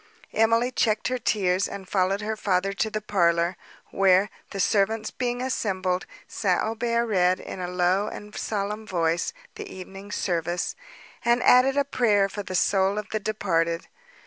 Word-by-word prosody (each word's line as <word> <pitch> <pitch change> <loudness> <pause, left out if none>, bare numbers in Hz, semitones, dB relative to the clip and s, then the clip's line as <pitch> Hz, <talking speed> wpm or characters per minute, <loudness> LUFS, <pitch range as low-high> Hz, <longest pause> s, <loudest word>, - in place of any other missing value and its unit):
Emily 230 +3 +3
checked 220 -3 +1
her 255 0 -1
tears, 190 -4 +1
and 195 -1 -8
followed 195 +1 +1
her 220 +1 -2
father 195 -2 0
to 220 +3 -1
the 215 0 -3
parlour, 170 -3 +2 0.4
where, 195 +1 +4 0.2
the 195 - -6
servants 215 +3 +1
being 245 0 -2
assembled, 190 -7 -1 0.2
St. 185 -4 0
Aubert 235 +1 0
read, 185 -4 +2
in - - -7
a 180 - -3
low 180 +3 +1
and 210 0 -8
solemn 210 +1 -3
voice, 170 -2 0 0.2
the - - -8
evening 195 +2 -9
service, 175 -2 -1 0.5
and 235 +1 +3
added 265 +2 +5
a 280 - +3
prayer 210 -7 +2
for 205 +1 -5
the 185 -2 -6
soul 195 +2 +2
of 210 0 -4
the 215 - 0
departed. 170 -6 -1
200 Hz, 160 wpm, -25 LUFS, 185-220 Hz, 0.5 s, added